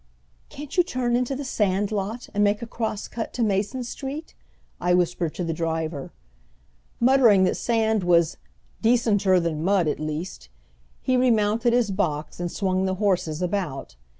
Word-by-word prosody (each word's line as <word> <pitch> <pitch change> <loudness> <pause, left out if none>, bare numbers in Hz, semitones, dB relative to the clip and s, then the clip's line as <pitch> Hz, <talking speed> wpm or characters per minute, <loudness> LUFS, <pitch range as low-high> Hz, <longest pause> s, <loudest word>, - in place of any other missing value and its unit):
"Can't 295 +4 -9
you - - +8
turn 250 -7 -1
into 250 +2 0
the 285 - -4
sand 205 -4 0
lot, 215 +4 -3
and 205 0 +2
make 205 +2 +1
a - - -3
cross 220 -2 -4
cut 230 - -5
to 245 - 0
Mason 210 +5 0
Street?" 275 +6 -6 0.5
I 180 0 +2
whispered 175 -2 0
to 180 - -3
the 165 -1 -2
driver. 160 -3 -3 0.9
Muttering 235 -6 +5
that 185 - +2
sand 220 -3 +1
was 170 -2 +3 0.4
"decenter 215 -5 +3
than 165 -2 -2
mud 190 -2 +2
at 150 - -1
least," 155 - -5 0.5
he 255 -1 +2
remounted 230 -1 +2
his 240 -4 +2
box 155 -7 -2
and 175 -1 -3
swung 190 -2 0
the 190 0 0
horses 180 -5 0
about. 175 - -3
200 Hz, 160 wpm, -24 LUFS, 175-235 Hz, 0.9 s, you